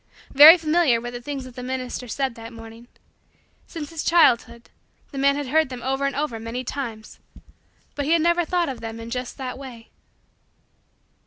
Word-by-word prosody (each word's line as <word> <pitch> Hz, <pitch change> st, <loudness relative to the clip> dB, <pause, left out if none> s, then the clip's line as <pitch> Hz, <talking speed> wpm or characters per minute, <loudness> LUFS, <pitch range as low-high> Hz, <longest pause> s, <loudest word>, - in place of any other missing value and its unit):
Very 305 Hz, +5 st, +10 dB
familiar 315 Hz, -6 st, +2 dB
were 240 Hz, +1 st, -6 dB
the 245 Hz, 0 st, -7 dB
things 275 Hz, +1 st, -5 dB
that 255 Hz, -1 st, -12 dB
the 250 Hz, -, -7 dB
minister 255 Hz, 0 st, -5 dB
said 265 Hz, +2 st, -2 dB
that 230 Hz, 0 st, -10 dB
morning. 225 Hz, 0 st, -12 dB, 0.8 s
Since 310 Hz, -3 st, -7 dB
his 325 Hz, -2 st, -5 dB
childhood, 235 Hz, -8 st, +2 dB, 0.4 s
the 275 Hz, -, -6 dB
man 280 Hz, +1 st, +3 dB
had 285 Hz, -2 st, -4 dB
heard 315 Hz, 0 st, +2 dB
them 250 Hz, -2 st, -8 dB
over 270 Hz, +1 st, -1 dB
and 275 Hz, -, -4 dB
over 285 Hz, -6 st, -3 dB
many 230 Hz, +3 st, -5 dB
times; 235 Hz, -5 st, -7 dB, 0.7 s
but 285 Hz, -, -3 dB
he 315 Hz, -, +2 dB
had 330 Hz, -2 st, +3 dB
never 345 Hz, +1 st, +3 dB
before 335 Hz, -, -6 dB, 0.2 s
thought -, -, -5 dB
of 260 Hz, -, -7 dB
them 225 Hz, 0 st, -7 dB
in 230 Hz, 0 st, -9 dB
just 250 Hz, 0 st, -5 dB
that 260 Hz, -1 st, -6 dB
way. 240 Hz, -4 st, -11 dB
260 Hz, 190 wpm, -23 LUFS, 235-290 Hz, 0.8 s, Very